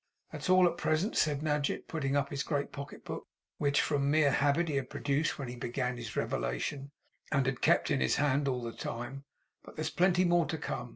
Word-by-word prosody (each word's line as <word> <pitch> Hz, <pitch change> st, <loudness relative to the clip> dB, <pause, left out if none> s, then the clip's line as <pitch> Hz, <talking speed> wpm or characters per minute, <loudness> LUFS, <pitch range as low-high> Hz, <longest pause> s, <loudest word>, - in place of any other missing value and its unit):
'That's -, -, -5 dB
all 185 Hz, -1 st, +7 dB
at 170 Hz, 0 st, -2 dB
present,' 160 Hz, +7 st, +1 dB
said 150 Hz, -1 st, +1 dB
Nadgett, 150 Hz, -2 st, -1 dB
putting 140 Hz, -4 st, -1 dB
up 140 Hz, -1 st, 0 dB
his 140 Hz, -1 st, -2 dB
great 145 Hz, -2 st, -2 dB
pocketbook, 140 Hz, 0 st, -7 dB, 0.3 s
which 140 Hz, -1 st, +3 dB
from 140 Hz, -2 st, +1 dB
mere 150 Hz, -1 st, +4 dB
habit 145 Hz, +5 st, +2 dB
he 145 Hz, -3 st, 0 dB
had 130 Hz, -2 st, -3 dB
produced 145 Hz, +2 st, 0 dB
when 135 Hz, -, -5 dB
he 120 Hz, -, -6 dB
began 125 Hz, +1 st, -2 dB
his 120 Hz, -3 st, -7 dB
revelation, -, -, -2 dB, 0.4 s
and 140 Hz, -3 st, +2 dB
had 130 Hz, -1 st, -1 dB
kept -, -, +3 dB
in -, -, +2 dB
his 65 Hz, -, +2 dB
hand 140 Hz, 0 st, +2 dB
all 125 Hz, -2 st, -1 dB
the 115 Hz, -1 st, -4 dB
time; 125 Hz, +4 st, -6 dB, 0.4 s
'but -, -, -13 dB
there -, -, -3 dB
is -, -, -2 dB
plenty 180 Hz, 0 st, +3 dB
more 175 Hz, -2 st, +3 dB
to 160 Hz, -, -2 dB
come. 125 Hz, -4 st, -4 dB
140 Hz, 215 wpm, -31 LUFS, 130-155 Hz, 0.4 s, all